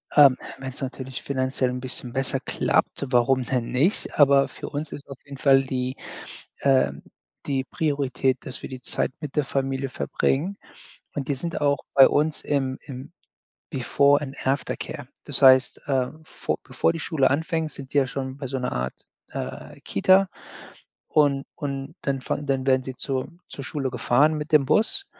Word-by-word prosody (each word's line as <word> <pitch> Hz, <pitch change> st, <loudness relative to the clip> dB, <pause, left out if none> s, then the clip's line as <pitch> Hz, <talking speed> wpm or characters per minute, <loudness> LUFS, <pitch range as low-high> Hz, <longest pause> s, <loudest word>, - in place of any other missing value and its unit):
Ähm, 140 Hz, -3 st, +8 dB, 0.2 s
wenn's 130 Hz, +1 st, -7 dB
natürlich 130 Hz, 0 st, -5 dB
finanziell 130 Hz, -1 st, 0 dB
'n 125 Hz, 0 st, -3 dB
bisschen 125 Hz, -1 st, -3 dB
besser 135 Hz, 0 st, 0 dB
klappt, -, -, 0 dB
warum 125 Hz, +1 st, +3 dB
denn 125 Hz, -2 st, -2 dB
nicht? 155 Hz, +12 st, 0 dB
Aber 140 Hz, -1 st, +6 dB
für -, -, -8 dB
uns 145 Hz, +1 st, -4 dB
ist 140 Hz, -, -8 dB
auf 135 Hz, -, -8 dB
jeden 140 Hz, -1 st, -9 dB
Fall 135 Hz, -1 st, +5 dB
die, 130 Hz, -1 st, -2 dB, 0.6 s
äh 135 Hz, -2 st, +3 dB, 0.5 s
die 135 Hz, -2 st, 0 dB
Priorität, 135 Hz, -3 st, 0 dB
dass 130 Hz, -, -7 dB
wir -, -, -5 dB
die 130 Hz, -1 st, -7 dB
Zeit -, -, -1 dB
mit 150 Hz, -3 st, -7 dB
der 150 Hz, -, +3 dB
Familie 135 Hz, 0 st, -2 dB
verbringen. 160 Hz, +8 st, -1 dB, 0.6 s
Und 140 Hz, -2 st, -4 dB
die 140 Hz, -, 0 dB
sind 165 Hz, +5 st, -4 dB
auch 145 Hz, -1 st, +3 dB, 0.2 s
bei 135 Hz, -1 st, +9 dB
uns 150 Hz, +1 st, +1 dB
im 135 Hz, -2 st, -1 dB
im 130 Hz, 0 st, -8 dB, 0.6 s
before 140 Hz, +1 st, +3 dB
and 135 Hz, -2 st, -6 dB
after 135 Hz, +1 st, 0 dB
care. -, -, -7 dB, 0.2 s
Das -, -, 0 dB
heißt, 130 Hz, -1 st, +6 dB
äh, 130 Hz, -2 st, +2 dB, 0.2 s
vo -, -, -3 dB
bevor 165 Hz, -, +1 dB
die 165 Hz, -, -5 dB
Schule 140 Hz, -5 st, +2 dB
anfängt, 160 Hz, +2 st, -1 dB
sind 135 Hz, -1 st, -10 dB
die -, -, +2 dB
ja 135 Hz, -2 st, +4 dB
schon 130 Hz, +1 st, -4 dB
bei 140 Hz, -, -5 dB
so 135 Hz, +1 st, -3 dB
'ner 125 Hz, -, -2 dB
Art, 65 Hz, +1 st, -4 dB, 0.3 s
äh, -, -, -6 dB
Kita. 190 Hz, -, +4 dB, 0.8 s
Und 140 Hz, -2 st, +3 dB
und 140 Hz, +1 st, -5 dB
dann 135 Hz, -1 st, -1 dB
fahren 145 Hz, -, -3 dB
dann 135 Hz, -1 st, 0 dB
werden 130 Hz, -1 st, +4 dB
sie 130 Hz, 0 st, -6 dB
zur 130 Hz, 0 st, -2 dB, 0.2 s
zur 140 Hz, -, -7 dB
Schule 135 Hz, -2 st, -2 dB
gefahren 130 Hz, +5 st, +3 dB
mit 150 Hz, +2 st, -5 dB
dem 150 Hz, -3 st, +6 dB
Bus. 390 Hz, -, +2 dB
135 Hz, 175 wpm, -25 LUFS, 130-145 Hz, 0.8 s, bei